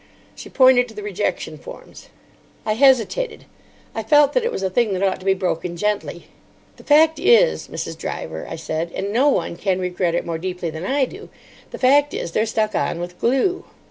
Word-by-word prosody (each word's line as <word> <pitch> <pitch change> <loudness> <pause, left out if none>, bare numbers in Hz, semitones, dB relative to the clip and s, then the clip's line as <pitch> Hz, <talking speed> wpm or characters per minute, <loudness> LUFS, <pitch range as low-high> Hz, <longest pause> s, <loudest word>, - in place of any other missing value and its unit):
She - - -11
pointed 255 -1 +5
to - - -14
the 420 - -7
rejection 415 - -3
forms. - - -12 0.6
I 215 - +1
hesitated. 265 - +2 0.5
I 225 - -3
felt 290 +5 +4
that - - +1
it 475 - -1
was 195 - -4
a 190 - 0
thing 225 0 +1
that 185 +1 -2
ought 195 - 0
to 185 - -13
be 190 - +4
broken 180 -2 -3
gently. 210 +2 -2 0.5
"The - - -15
fact 310 +1 +4
is, 475 +5 +4
Mrs. - - -5
Driver," - - -5
I - - -5
said, 160 +1 -4
"and 200 +2 -3
no 265 +5 +4
one 220 - -1
can 190 -1 -1
regret 180 -1 -1
it - - -1
more 165 -1 -4
deeply 180 -1 -4
than 160 +3 -6
I 275 0 +2
do—the 405 +11 -14
fact 285 +3 +3
is, 170 - -4
they're 215 +6 0
stuck 215 -1 -1
on 170 - -1
with 175 +1 -7
glue." 270 +10 +1
220 Hz, 200 wpm, -21 LUFS, 180-290 Hz, 0.6 s, pointed